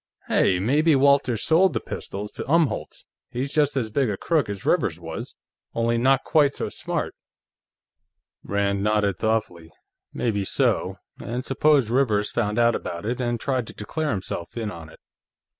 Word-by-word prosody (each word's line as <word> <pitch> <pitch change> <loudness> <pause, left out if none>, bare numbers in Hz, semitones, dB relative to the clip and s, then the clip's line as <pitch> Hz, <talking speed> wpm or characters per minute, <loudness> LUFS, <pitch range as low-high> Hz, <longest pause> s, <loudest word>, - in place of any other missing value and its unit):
"Hey! 90 - +3
Maybe 145 - +3
Walters 140 -4 +3
sold 170 +2 +4
the 110 - 0
pistols 105 0 -6
to - - -5
Umholtz! 160 -9 0 0.2
He's 135 +3 -3
just 145 -3 +2
as 115 -4 -1
big 135 0 +1
a 100 - -2
crook 155 - 0
as 100 -1 -5
Rivers - - +1
was, - - -6 0.4
only 115 0 +1
not 135 +2 +3
quite 145 -3 +3
so - - -3
smart." - - -3 1.3
Rand 100 0 0
nodded 105 -3 +1
thoughtfully. 105 -7 -1 0.4
"Maybe 105 -4 -1
so. - - +1 0.3
And 120 +4 -4
suppose 135 -3 +3
Rivers 110 -6 +2
found 105 -2 -1
out 120 0 +4
about 85 -1 -5
it, 120 +3 -2
and 120 -1 -1
tried 130 -3 -1
to - - -8
declare 155 +9 -3
himself 95 -1 -4
in 110 -2 -2
on 85 -3 -10
it. - - -16
115 Hz, 160 wpm, -24 LUFS, 105-140 Hz, 1.3 s, sold